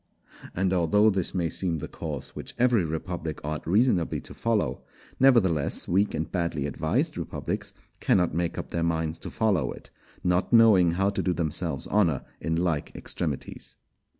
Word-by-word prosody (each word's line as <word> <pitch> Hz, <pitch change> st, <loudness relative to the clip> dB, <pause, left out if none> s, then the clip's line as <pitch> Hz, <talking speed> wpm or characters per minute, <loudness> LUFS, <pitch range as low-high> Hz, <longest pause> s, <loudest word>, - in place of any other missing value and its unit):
And 95 Hz, +1 st, +1 dB
although 100 Hz, +5 st, +4 dB
this 95 Hz, -2 st, -2 dB
may 85 Hz, -2 st, +1 dB
seem 85 Hz, 0 st, +1 dB
the 75 Hz, +1 st, -5 dB
course 75 Hz, -6 st, -6 dB
which -, -, -8 dB
every 120 Hz, -5 st, +3 dB
republic 80 Hz, 0 st, -4 dB
ought 75 Hz, +1 st, -4 dB
reasonably 95 Hz, -2 st, +2 dB
to -, -, -8 dB
follow, 115 Hz, -2 st, -1 dB, 0.4 s
nevertheless 100 Hz, -, +3 dB
weak 100 Hz, +4 st, +1 dB
and 80 Hz, -, -3 dB
badly 85 Hz, -6 st, -1 dB
advised 75 Hz, -, -1 dB
republics -, -, -4 dB, 0.3 s
cannot 90 Hz, -4 st, +2 dB
make 85 Hz, +1 st, -1 dB
up -, -, -6 dB
their 85 Hz, -, -1 dB
minds 80 Hz, -1 st, -1 dB
to -, -, -7 dB
follow 105 Hz, -7 st, +1 dB
it, -, -, -12 dB, 0.3 s
not 90 Hz, +1 st, +1 dB
knowing 105 Hz, -7 st, +6 dB
how 95 Hz, +3 st, +1 dB
to 100 Hz, -, -2 dB
do 90 Hz, -, 0 dB
themselves 80 Hz, -3 st, -2 dB
honour 85 Hz, -10 st, +2 dB, 0.2 s
in 80 Hz, -, -1 dB
like 85 Hz, -3 st, -1 dB
extremities. -, -, -4 dB
85 Hz, 160 wpm, -26 LUFS, 80-100 Hz, 0.4 s, knowing